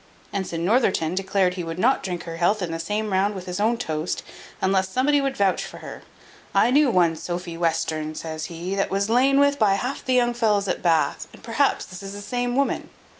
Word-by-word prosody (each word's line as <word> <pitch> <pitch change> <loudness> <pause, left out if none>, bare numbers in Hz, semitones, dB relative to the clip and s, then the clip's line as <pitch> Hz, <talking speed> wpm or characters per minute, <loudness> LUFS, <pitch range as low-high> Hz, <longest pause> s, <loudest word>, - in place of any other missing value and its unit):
Ensign 175 -4 -2
Northerton 190 -7 +2
declared 190 -1 +1
he 180 -1 -4
would 165 0 -5
not 250 +8 +3
drink 180 -2 -4
her 165 -1 -7
health 185 +4 +2
in 170 - -3
the 165 - -3
same 210 +4 -2
round 200 +2 +1
with 185 -1 -7
his 180 +1 -4
own 225 +3 +2
toast, 155 -3 -3 0.4
unless 190 0 +1
somebody 280 +6 +2
would 275 -1 -2
vouch 195 -2 +2
for - - -9
her. - - -9 0.5
"I 220 +5 +4
knew 290 +1 +5
one 175 -6 +3
Sophy 175 +1 -5
Western," 160 -2 -1
says 155 -1 -5
he, 170 +3 -5
"that 195 0 0
was 200 +2 0
lain 270 +3 +4
with 285 0 +3
by 205 -3 +4
half 250 +7 -3
the 255 - +1
young 240 -1 +3
fellows 210 -4 +1
at - - -2
Bath; 165 -3 +1
and - - -15
perhaps 250 +4 +1
this 185 +1 -10
is 195 0 -7
the 205 - -7
same 245 +2 -2
woman." 275 +1 0
195 Hz, 220 wpm, -24 LUFS, 175-240 Hz, 0.5 s, knew